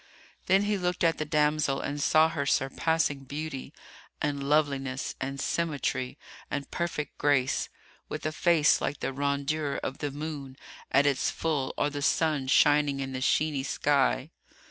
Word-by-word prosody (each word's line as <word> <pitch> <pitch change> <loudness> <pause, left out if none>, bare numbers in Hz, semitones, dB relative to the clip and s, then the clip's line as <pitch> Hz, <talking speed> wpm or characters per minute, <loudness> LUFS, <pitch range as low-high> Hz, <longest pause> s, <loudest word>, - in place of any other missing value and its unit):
Then 190 +2 +4
he 205 -1 0
looked 180 0 -1
at 165 -1 +2
the 155 - -1
damsel 150 -2 +1
and 145 0 -3
saw 155 +2 +5
her 140 -3 -3
surpassing 145 +2 +1
beauty 145 0 -5 0.5
and 145 -2 -1
loveliness 140 -3 0
and 135 +1 -3
symmetry 145 -5 -1 0.3
and 140 -1 -4
perfect 155 -4 -3
grace, 140 -3 +2 0.4
with - - -5
a 155 - 0
face 160 -1 +3
like 140 - -2
the - - -2
rondure 140 +1 -1
of 135 - -4
the 145 - -2
moon 140 -2 -6 0.3
at 140 - +4
its 140 -2 +2
full 150 -5 -1
or 145 - +1
the 145 0 -4
sun 150 -2 +1
shining 145 +1 +4
in 135 -1 -3
the 130 - -4
sheeny 145 0 +1
sky. 140 +1 +1
145 Hz, 155 wpm, -28 LUFS, 135-155 Hz, 0.5 s, saw